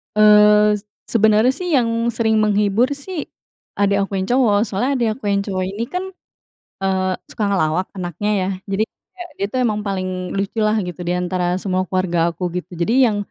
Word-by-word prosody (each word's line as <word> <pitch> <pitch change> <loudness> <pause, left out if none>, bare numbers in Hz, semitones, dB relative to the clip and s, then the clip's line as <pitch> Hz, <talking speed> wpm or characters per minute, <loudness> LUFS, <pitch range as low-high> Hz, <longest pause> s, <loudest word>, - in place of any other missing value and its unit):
Eee, 210 0 +6
s 205 - -25 0.2
sebenarnya 220 +2 +4
sih, 360 +7 -6
yang 230 -2 +1
sering 225 -2 +1
menghibur 210 +2 +2
sih, 310 +3 -6 0.5
adik 200 0 +2
aku - - -35
yang 190 - 0
cowok. 245 -5 +3
Soalnya 225 +4 -1
adik 240 -3 +1
aku - - -38
yang 200 0 +1
cowok 190 -2 -2
ini 200 +4 -4
kan, 360 +1 -2 0.8
eee, 190 -1 +1 0.2
suka 215 - -4
ngelawak 180 -1 0
anaknya, 180 +3 -3
ya. 185 - -1 0.2
Jadi 195 +2 +1
kayak, 355 +8 -13
dia - - +2
itu 255 - -3
emang 220 -4 0
paling 195 -2 -3 0.3
lucu 200 +3 -2
lah, 215 +1 +2
gitu, 180 0 -7
di 175 0 -1
antara 180 0 -1
semua 185 -1 -1
keluarga 175 -3 +1
aku, 170 +2 -5
gitu. 180 0 -6
Jadi 170 +7 0 0.2
yang 210 - -2
205 Hz, 185 wpm, -20 LUFS, 185-225 Hz, 0.8 s, Eee